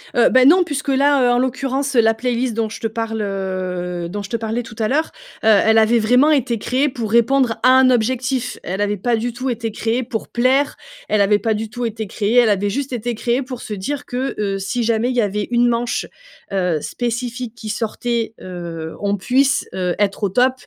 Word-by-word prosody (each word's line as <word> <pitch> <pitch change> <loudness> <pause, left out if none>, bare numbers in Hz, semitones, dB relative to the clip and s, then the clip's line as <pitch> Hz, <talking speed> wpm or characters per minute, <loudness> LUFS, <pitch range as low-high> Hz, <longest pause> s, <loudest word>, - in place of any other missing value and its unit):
Heu, 240 - +5
bah 255 0 +5
non, 355 +6 +6
puisque 295 -3 -4
là, 275 0 +3
heu, 245 - +4
en 245 - +3
l'occurrence, 270 +2 -1
heu, 235 - +6
la 225 0 +3
playlist 245 +1 -1
dont 220 0 -1
je 215 - -8
te 225 - -1
parle, 225 0 -3
heu, 185 -3 -3
dont 205 +3 -5
je 200 - -8
te 230 - -1
parlais 225 +2 -3
tout 225 - -11
à 215 - +1
l'heure, 310 +6 0 0.3
heu, - - +1
elle 220 +1 +5
avait 225 +1 +4
vraiment 250 +8 +4
été 250 -5 +1
créée 260 +7 0
pour 230 -5 -5
répondre 235 +1 +3
à 255 - +6
un 260 -1 +5
objectif. 250 +1 0
Elle 190 +3 -3
avait 205 0 0
pas 235 +5 0
du 235 +2 -2
tout 255 +2 -3
été 230 -2 -3
créée 230 +4 -1
pour 230 -2 -5
plaire, 260 +4 +2 0.3
elle 215 - +2
avait 205 +1 +3
pas 225 0 0
du 215 +1 -4
tout 245 +2 -4
été 220 -1 -4
créée 210 +3 -1
elle 235 -3 +4
avait 205 0 +1
juste 265 +4 -3
été 240 0 -3
créée 240 +3 0
pour 255 -2 -7
se 215 - -6
dire 275 +9 -4
que, 255 +2 -3
heu, 195 -2 -1
si 215 +5 -2
jamais 230 +1 +1
il 255 - -2
y 245 - +3
avait 205 0 -1
une 240 0 +3
manche, 240 0 -1 0.5
heu, 180 -5 0
spécifique 240 0 -4
qui 215 - -8
sortait, 230 +1 -2
heu, 170 -3 -7
on 200 0 0
puisse, 265 +7 +1
heu, 180 -2 -1
être 205 +1 0
au 200 - +2
top 250 +6 +3
230 Hz, 225 wpm, -19 LUFS, 210-255 Hz, 0.5 s, non